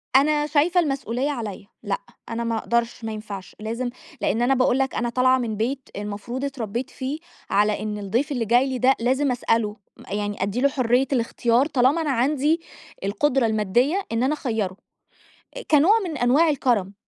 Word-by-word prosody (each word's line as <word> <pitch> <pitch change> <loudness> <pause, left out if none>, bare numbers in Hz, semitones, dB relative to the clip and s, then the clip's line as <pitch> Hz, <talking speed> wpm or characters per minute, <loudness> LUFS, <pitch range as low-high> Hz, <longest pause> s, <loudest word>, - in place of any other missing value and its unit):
أنا 295 +2 +4
شايفة 315 +4 +3
المسؤلية 275 -3 -1
عليّا، 210 -6 -6 0.2
لأ - - -2 0.3
أنا 230 0 -2
ما 230 -1 -1
اقدرش، 235 +1 -1
ما 220 - -3
ينفعش، 210 -3 -7
لازم 230 +3 -3 0.3
لإن 230 - +1
أنا 260 +3 +3
باقول 255 0 +2
لك 270 -1 0
أنا 240 0 0
طالعة 255 +1 +3
من 230 -4 -3
بيت 255 +5 -2
المفروض 210 +6 -4
اتربيت 245 -2 -4
فيه، 270 +5 -4 0.3
على 210 +1 +2
إن 210 -1 -3
الضيف 225 +9 -1
اللي 245 -5 -1
جاي 245 +5 +3
لي 260 - -2
ده 260 +2 +4
لازم 260 +3 +1
اسأله، 225 -3 0 0.2
م - - -14
يعني 205 -1 -2
ادّي 205 +6 -1
له 280 - +4
حرّية 255 0 +2
الاختيار 235 +1 +2
طالما 285 +1 +2
أنا 300 -3 0
عندي 290 +6 +1 0.4
القدرة 255 +6 +1
المادّية، 225 - +1
إن 230 +2 0
أنا 275 +4 +2
اخيّره، 220 -9 -2 0.8
أ - - -5
كنوع 320 +9 +6
من 320 -5 -4
أنواع 265 +7 +4
الكرم. 225 -9 0
245 Hz, 175 wpm, -23 LUFS, 220-275 Hz, 0.8 s, كنوع